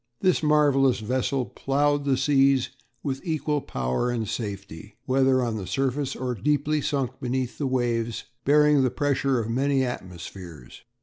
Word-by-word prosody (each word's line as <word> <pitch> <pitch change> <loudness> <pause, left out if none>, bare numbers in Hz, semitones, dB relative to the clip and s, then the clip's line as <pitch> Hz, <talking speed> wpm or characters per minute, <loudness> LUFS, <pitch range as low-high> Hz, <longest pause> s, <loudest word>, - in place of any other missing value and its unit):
This 185 -1 +3
marvellous 145 -4 +3
vessel 130 +3 -1
ploughed 145 +2 0
the 135 -2 +2
seas 135 -1 +3 0.3
with 135 -1 -3
equal 155 -3 -1
power 65 - -2
and 115 -3 -2
safety, 100 -2 -6
whether 130 -1 +3
on 115 -2 -2
the 95 -3 -6
surface 135 +4 -1
or 125 -1 -2
deeply 150 +6 0
sunk 135 -4 -2
beneath 125 0 -3
the 140 - 0
waves, 120 -3 -1 0.2
bearing 150 0 +5
the 130 - +2
pressure 140 -1 0
of 110 - -3
many 135 +2 +1
atmospheres. 90 - -8
130 Hz, 145 wpm, -25 LUFS, 115-140 Hz, 0.3 s, bearing